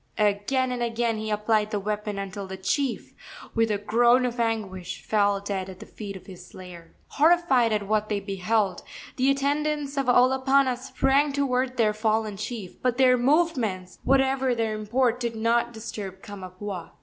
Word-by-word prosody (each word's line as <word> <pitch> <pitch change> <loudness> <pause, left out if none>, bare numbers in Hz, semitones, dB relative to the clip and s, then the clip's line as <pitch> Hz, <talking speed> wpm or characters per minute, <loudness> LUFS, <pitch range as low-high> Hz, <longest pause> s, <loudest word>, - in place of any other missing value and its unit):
Again 215 +5 +1
and 245 -1 -3
again 230 -1 -1
he 215 0 -4
applied 210 0 +1
the 210 -2 -2
weapon 210 0 -3
until 195 0 -5
the 190 0 -7
chief, 235 +7 -2 0.4
with 225 -1 +2
a 210 - +1
groan 240 +4 +3
of 245 -1 -3
anguish, 195 -6 -3
fell 205 -2 +2
dead 195 -1 -4
at 185 -1 -10
the 220 - -9
feet 200 -2 -8
of 190 - -11
his 185 -2 -11
slayer. 180 -2 -12
Horrified 305 -7 +3
at 210 -2 -1
what 215 0 0
they 205 -2 0
beheld, 195 0 -1 0.4
the 260 +1 +3
attendants 285 +1 0
of 275 -2 0
Olopana 260 +1 +4
sprang 275 +3 +1
toward 260 -2 0
their 215 -3 +3
fallen 215 -1 0
chief. 210 -2 -7
But 250 -1 0
their 255 -1 +5
movements, 245 - 0
whatever 265 -1 +2
their 225 -2 -1
import, 235 +3 0
did 235 -2 -3
not 235 +2 +1
disturb 205 -4 -7
Kamapuaa. 190 -1 -7
225 Hz, 165 wpm, -25 LUFS, 200-255 Hz, 0.4 s, their